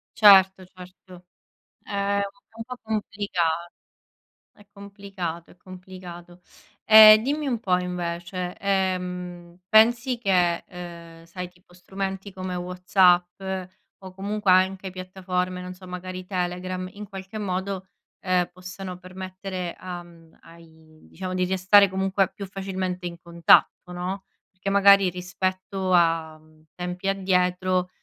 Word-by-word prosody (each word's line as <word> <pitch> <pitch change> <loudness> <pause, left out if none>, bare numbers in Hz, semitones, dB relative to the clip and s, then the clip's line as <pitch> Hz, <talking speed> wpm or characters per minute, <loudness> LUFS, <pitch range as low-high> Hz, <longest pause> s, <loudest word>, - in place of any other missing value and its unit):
Certo, 190 -3 +6
certo, 180 0 -15 0.6
è 200 0 -2 0.4
un 225 - -7
po' 250 +1 -8
complica 205 -4 -3 1.2
è 205 - -19
complicato, 200 -4 -7
è - - -18
complicato. 180 -1 -12 0.4
E 215 0 +10
dimmi 290 +4 -2
un 240 -3 -1
po' 185 -5 +1
invece, 180 0 -4
ehm, 180 -3 -2
pensi 235 +4 +4
che, 180 -6 +2
uhm, 170 -2 -10
sai 180 +2 -7
tipo 180 0 -25
strumenti 195 +2 -5
come 185 -1 -5
WhatsApp 180 0 +2 0.6
o 190 -1 -11
comunque 200 0 0
anche 190 +1 +2
piattaforme, 185 0 -4
non 180 0 -7
so, 185 0 -14
magari 185 0 -7
Telegram, 185 0 -3
in 210 0 -9
qualche 195 +1 -8
modo, 190 -1 -3 0.3
ehm, 180 -1 0
possano 185 0 -8
permettere 185 0 -6
a 180 -1 -7
m 165 -2 -19
ai 160 -1 -18
diciamo 185 +1 -6
di 185 0 0
restare 190 +2 +5
comunque 190 +1 0
più 200 - -7
facilmente 185 -2 -4
in 170 -1 -6
contatto, 170 +1 +3
no. 180 +2 -5 0.3
Perché 185 +1 -5
magari 200 -1 +6
rispetto 185 +1 -3
a, 165 -2 +2
mhmm, 155 0 -24
tempi 180 +2 -4
addietro 185 -1 +1
185 Hz, 120 wpm, -24 LUFS, 180-195 Hz, 1.2 s, E